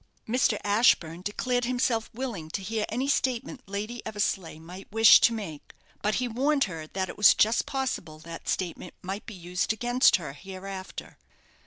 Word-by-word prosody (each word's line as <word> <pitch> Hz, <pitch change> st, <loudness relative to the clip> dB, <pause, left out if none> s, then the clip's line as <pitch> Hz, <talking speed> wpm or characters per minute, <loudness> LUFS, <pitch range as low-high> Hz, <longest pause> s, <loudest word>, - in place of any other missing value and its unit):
Mr. 230 Hz, -2 st, +2 dB
Ashburne 200 Hz, -6 st, +3 dB
declared 245 Hz, +5 st, -1 dB
himself 245 Hz, -2 st, 0 dB
willing 225 Hz, -10 st, -5 dB
to 195 Hz, +4 st, -4 dB
hear 215 Hz, +1 st, -2 dB
any 250 Hz, +5 st, -1 dB
statement 260 Hz, -1 st, -1 dB
Lady 210 Hz, +4 st, -5 dB
Eversleigh 200 Hz, -6 st, -2 dB
might 180 Hz, +4 st, -11 dB
wish 225 Hz, +1 st, +8 dB
to -, -, +5 dB
make; 195 Hz, -10 st, -7 dB, 0.3 s
but 210 Hz, +1 st, +1 dB
he 250 Hz, -, 0 dB
warned 275 Hz, +5 st, +2 dB
her 165 Hz, -5 st, -5 dB
that 190 Hz, +3 st, -3 dB
it -, -, -8 dB
was 210 Hz, -, +8 dB
just 220 Hz, +2 st, +3 dB
possible 250 Hz, -, -3 dB
that 165 Hz, +1 st, -8 dB
statement 180 Hz, -1 st, -3 dB
might 195 Hz, +4 st, -5 dB
be 215 Hz, -, -7 dB
used 180 Hz, +2 st, -2 dB
against 245 Hz, +3 st, +4 dB
her 150 Hz, -7 st, -4 dB
hereafter. 190 Hz, +3 st, -8 dB
210 Hz, 165 wpm, -27 LUFS, 180-240 Hz, 0.3 s, wish